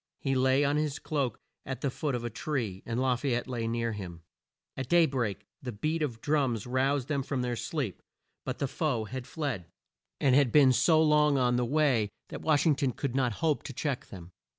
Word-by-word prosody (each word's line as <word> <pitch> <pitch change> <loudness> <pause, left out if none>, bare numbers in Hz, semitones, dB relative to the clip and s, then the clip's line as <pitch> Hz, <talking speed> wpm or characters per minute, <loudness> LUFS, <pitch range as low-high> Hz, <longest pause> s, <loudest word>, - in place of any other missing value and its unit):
He 135 - -1
lay 130 +2 +3
on 145 +1 +2
his 150 -1 -1
cloak 140 -7 -2 0.2
at 130 -1 -5
the 140 - 0
foot 145 0 -2
of 120 - -3
a 120 - -2
tree, 115 -7 -3
and 115 +1 -1
La 130 -1 +2
fay 125 0 -1
ette 120 - -3
lay 120 -3 -2
near 115 0 -1
him. 90 -5 -7 0.5
At 130 -2 -5
day 170 -1 +6
break 120 -9 -2 0.2
the 125 -3 -4
beat 155 +9 -2
of 120 -7 -2
drums 135 -8 +1
roused 130 +1 +1
them 145 -3 0
from 130 -1 -2
their 125 -1 -1
sleep, 130 - -3 0.4
but - - -4
the 140 - -1
foe 130 -5 -1
had 125 +4 -6
fled, 135 - -3 0.5
and 135 -3 +3
had 135 -3 +4
been 140 -4 +6
so 160 +5 +4
long 150 -2 +4
on 125 -2 +2
the 125 0 +1
way 130 -6 +2 0.2
that - - -7
Wash 155 -1 +2
ing 160 - +5
ton 135 -3 0
could 140 -4 -3
not 125 -4 +1
hope 155 -3 +2
to 135 - -8
check 135 0 -3
them. 90 -2 -11
130 Hz, 220 wpm, -29 LUFS, 120-145 Hz, 0.5 s, day